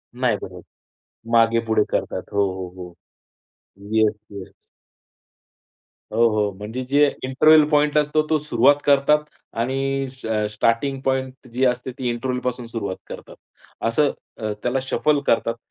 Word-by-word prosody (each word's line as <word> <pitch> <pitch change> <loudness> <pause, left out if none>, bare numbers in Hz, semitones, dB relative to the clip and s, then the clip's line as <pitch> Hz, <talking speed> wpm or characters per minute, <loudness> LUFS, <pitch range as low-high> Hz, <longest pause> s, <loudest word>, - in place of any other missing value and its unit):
नाही 125 -4 +1
बनत. 90 -2 -9 0.7
मागे-पुढे 115 -1 +3
करतात. - - -2
हो, 100 0 +3
हो, 95 -1 -6
हो. 90 -1 -9 1.0
Yes, 110 -1 +3 0.2
yes. 100 -2 -9 1.6
हो, 115 +1 +4
हो 105 -2 0
म्हणजे 110 +5 -5
जे 145 +1 +5 0.2
इंटरवल 155 +4 +5
पॉइंट 150 0 +2
असतो 150 +1 +2
तो 155 - +3
सुरुवात 140 -1 +4
करतात 145 +2 +4 0.4
आणि 135 +2 -1
श 130 -2 -14
अ, 110 -1 0
स्टार्टिंग 115 +6 0
पॉइंट 130 -1 -2
जी 130 +2 +1
असते 125 +1 0
ती 125 -2 -2
इंटरवलपासून 125 0 -3
सुरुवात 105 -5 -4
करतात. - - -10 0.5
असं 140 +5 +2 0.3
अ, 110 -2 -3
त्याला 125 +2 0
शफल 145 +2 +1
करतात. 115 0 +2
125 Hz, 135 wpm, -22 LUFS, 110-135 Hz, 1.6 s, जे